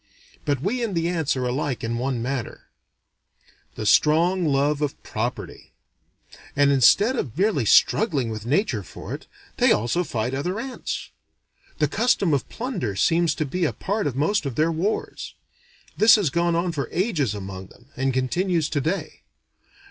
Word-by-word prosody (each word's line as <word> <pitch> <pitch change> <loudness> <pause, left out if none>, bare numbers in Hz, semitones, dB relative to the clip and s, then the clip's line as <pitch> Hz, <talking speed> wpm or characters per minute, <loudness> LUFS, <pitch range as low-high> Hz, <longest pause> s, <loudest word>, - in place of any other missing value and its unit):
But 140 -3 0
we 235 +7 -1
and 210 -5 -2
the 165 0 0
ants 160 -6 0
are 125 - -1
alike 130 +1 -2
in 115 +1 -2
one 125 -2 -2
matter: 130 -1 -5 1.1
the 110 - -5
strong 165 - +4
love 145 0 +1
of 150 0 -2
property. 120 +3 -5 0.8
And 140 0 +4
instead 200 - +5
of 135 - -4
merely 190 - +1
struggling 140 - +3
with 110 -1 -6
Nature 135 - 0
for 95 - -9
it, - - -8 0.3
they - - +4
also 120 +11 +1
fight 125 -4 -3
other 180 +10 -2
ants. 260 +2 -5 0.7
The 150 - +2
custom 200 - +1
of 140 - -1
plunder 200 - -3
seems 165 - +2
to 155 - -1
be 180 +6 -2
a 160 - +1
part 205 -2 -2
of 135 - -3
most 155 +4 +1
of 130 - -5
their 160 +4 +2
wars. 180 +7 -3 0.6
This 215 +1 +7
has 195 -10 +1
gone 170 +2 +1
on 170 +1 0
for 145 -4 -4
ages 165 - 0
among 95 -2 -7
them, 120 +6 -21
and 135 +1 0
continues 160 +5 0
today. 160 +6 -2
150 Hz, 165 wpm, -24 LUFS, 130-180 Hz, 1.1 s, This